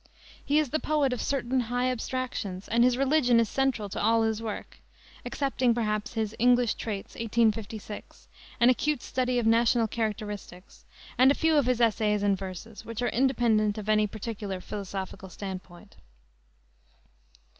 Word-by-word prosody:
He 290 Hz, -, +1 dB
is 305 Hz, -5 st, +1 dB
the 310 Hz, -, +1 dB
poet 295 Hz, -5 st, +1 dB
of 250 Hz, -, -3 dB
certain 260 Hz, -2 st, 0 dB
high 245 Hz, +1 st, 0 dB
abstractions, 235 Hz, -6 st, -4 dB
and 235 Hz, +2 st, +3 dB
his 250 Hz, 0 st, +3 dB
religion 270 Hz, -3 st, +3 dB
is 230 Hz, -, +2 dB
central 265 Hz, -4 st, 0 dB
to -, -, -4 dB
all 225 Hz, +1 st, +3 dB
his 220 Hz, 0 st, 0 dB
work 220 Hz, -2 st, -6 dB, 0.4 s
excepting, 260 Hz, -4 st, 0 dB
perhaps, 215 Hz, -2 st, -1 dB
his 220 Hz, -1 st, -2 dB
English 245 Hz, -1 st, +4 dB
Traits, 205 Hz, -3 st, -5 dB
1856, 220 Hz, -2 st, -2 dB, 0.3 s
an 240 Hz, +2 st, +6 dB
acute 295 Hz, +1 st, 0 dB
study 255 Hz, -1 st, -1 dB
of 240 Hz, -, +1 dB
national 230 Hz, +1 st, +3 dB
characteristics, 210 Hz, -4 st, -5 dB, 0.3 s
and 260 Hz, +1 st, +7 dB
a 280 Hz, -, +4 dB
few 320 Hz, -1 st, +2 dB
of 285 Hz, -4 st, +3 dB
his 250 Hz, -2 st, +2 dB
essays 215 Hz, -3 st, +2 dB
and 200 Hz, -1 st, +3 dB
verses, 195 Hz, +3 st, -8 dB
which 230 Hz, +1 st, -5 dB
are 245 Hz, -, +1 dB
independent 230 Hz, -5 st, +2 dB
of 210 Hz, -1 st, -6 dB
any 215 Hz, 0 st, +3 dB
particular 205 Hz, -2 st, -5 dB
philosophical 190 Hz, -1 st, -6 dB
standpoint. 190 Hz, 0 st, -8 dB
230 Hz, 155 wpm, -28 LUFS, 210-250 Hz, 0.4 s, and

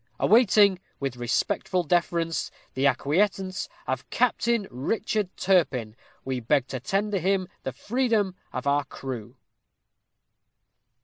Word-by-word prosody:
Awaiting, 205 Hz, -4 st, +5 dB, 0.2 s
with 135 Hz, -2 st, -2 dB
respectful 125 Hz, +9 st, 0 dB
deference, 170 Hz, 0 st, 0 dB, 0.2 s
the 135 Hz, +2 st, +2 dB
acquiescence 185 Hz, +8 st, 0 dB, 0.2 s
of 130 Hz, 0 st, -3 dB
Captain 235 Hz, -3 st, +1 dB
Richard 210 Hz, -, -1 dB
Turpin, 135 Hz, -, +1 dB, 0.3 s
we 130 Hz, -1 st, -2 dB
beg 130 Hz, +3 st, +2 dB
to 130 Hz, -, -3 dB
tender 195 Hz, -, 0 dB
him 185 Hz, +1 st, +1 dB
the 130 Hz, -, -3 dB
freedom 220 Hz, -, 0 dB, 0.2 s
of 130 Hz, -, -4 dB
our 145 Hz, +1 st, +2 dB
crew." 125 Hz, -4 st, -7 dB
175 Hz, 110 wpm, -26 LUFS, 130-200 Hz, 0.3 s, Awaiting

